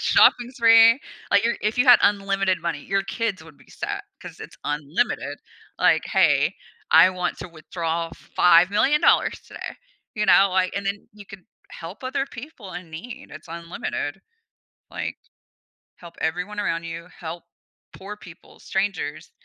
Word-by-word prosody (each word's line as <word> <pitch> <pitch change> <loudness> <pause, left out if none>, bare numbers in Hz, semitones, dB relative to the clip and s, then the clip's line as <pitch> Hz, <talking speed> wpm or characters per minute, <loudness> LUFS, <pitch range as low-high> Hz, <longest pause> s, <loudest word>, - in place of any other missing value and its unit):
Shopping 245 0 +4
spree, 230 -1 +6 0.3
like 200 +2 +4
you're 235 - +2
if 215 +3 -1
you 250 - +3
had 245 -1 +8
unlimited 195 -2 +1
money, 165 -3 -4
your 195 0 0
kids 200 -4 -3
would 160 -3 -16
be - - -22
set - - -5 0.2
'cause - - -11
it's - - -10
unlimited, 150 - -2 0.4
like, - - +3
"Hey, - - +2 0.3
I 185 - +7
want 180 -1 -3
to - - -7
withdraw 165 0 -4 0.2
$5 180 +1 +6
million 275 +9 +3
dollars - - +3
today," - - -8 0.4
you 210 -2 -1
know, 195 +1 +6
like 185 0 +1
and 200 - -3
then 200 +1 -3
you 210 -1 -13
could 195 -2 -13 0.3
help 170 +8 -10
other 270 +1 -2
people 245 -7 -11
in 175 -1 -9
need 240 +12 -9
it's 155 - -11
unlimited, 170 0 -5 0.7
like, - - -5 0.8
help 170 -1 -14
everyone 180 +6 -3
around 165 -4 -1
you, 165 +1 -7
help 170 +1 -7 0.5
poor 205 +2 -8
people, 175 -4 -16
strangers, 195 +1 -3
195 Hz, 155 wpm, -23 LUFS, 170-210 Hz, 0.8 s, had